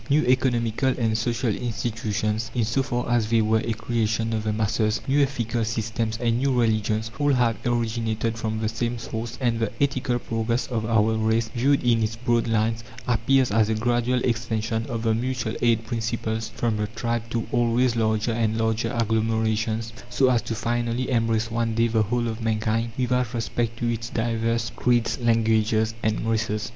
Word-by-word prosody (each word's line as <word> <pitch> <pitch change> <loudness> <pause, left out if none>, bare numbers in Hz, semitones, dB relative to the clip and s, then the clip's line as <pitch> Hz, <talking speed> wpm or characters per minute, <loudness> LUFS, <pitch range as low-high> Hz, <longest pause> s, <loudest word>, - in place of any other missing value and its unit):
New 150 +2 +4
economical 125 -1 +2
and 115 -3 +1
social 115 +1 0
institutions, 110 -2 -2
in 120 -3 +2
so 115 +5 +1
far 125 -2 -2
as 120 -3 +1
they 115 0 +3
were 110 0 +3
a 115 - -1
creation 115 0 -1
of 110 -1 -1
the 110 - +1
masses, 110 0 0
new 140 +2 +3
ethical 120 -4 0
systems, 110 0 -2
and 115 0 +1
new 130 -2 +1
religions, 110 -1 +1
all 145 0 +3
have 120 -4 +2
originated 115 -1 -1
from 110 -1 -3
the 110 0 -1
same 115 +2 -2
source, 115 +1 -5
and 120 -3 0
the 110 -2 -1
ethical 135 -3 +1
progress 115 +1 -1
of 110 -3 -2
our 110 -1 +3
race, 110 +1 +1
viewed 140 +3 +1
in 115 -2 +3
its 110 0 -1
broad 120 0 0
lines, 115 0 0 0.2
appears 125 +1 +2
as 110 0 +3
a 110 - +1
gradual 120 +2 +1
extension 115 -1 -1
of 115 -1 -3
the 115 -1 +2
mutual 120 -1 -2
aid 115 -2 +2
principles 115 -1 -2
from 115 -3 -1
the 105 0 -1
tribe 115 +1 -2
to 115 -1 -2
always 120 0 +2
larger 110 0 +1
and 110 -1 0
larger 110 0 0
agglomerations, 110 0 0 0.2
so 130 +1 +3
as 120 -2 +2
to 115 - -4
finally 120 +3 -1
embrace 115 -2 +1
one 115 -1 -1
day 115 +1 +3
the 110 -1 +2
whole 120 +3 0
of 110 0 -4
mankind, 110 +1 0
without 125 -1 0
respect 115 0 -2
to 120 - -1
its 115 0 -5
divers 115 0 -1
creeds, 120 -1 +1
languages, 110 -1 +2
and 110 +1 -1
races. 110 -2 -1
115 Hz, 180 wpm, -24 LUFS, 110-120 Hz, 0.2 s, New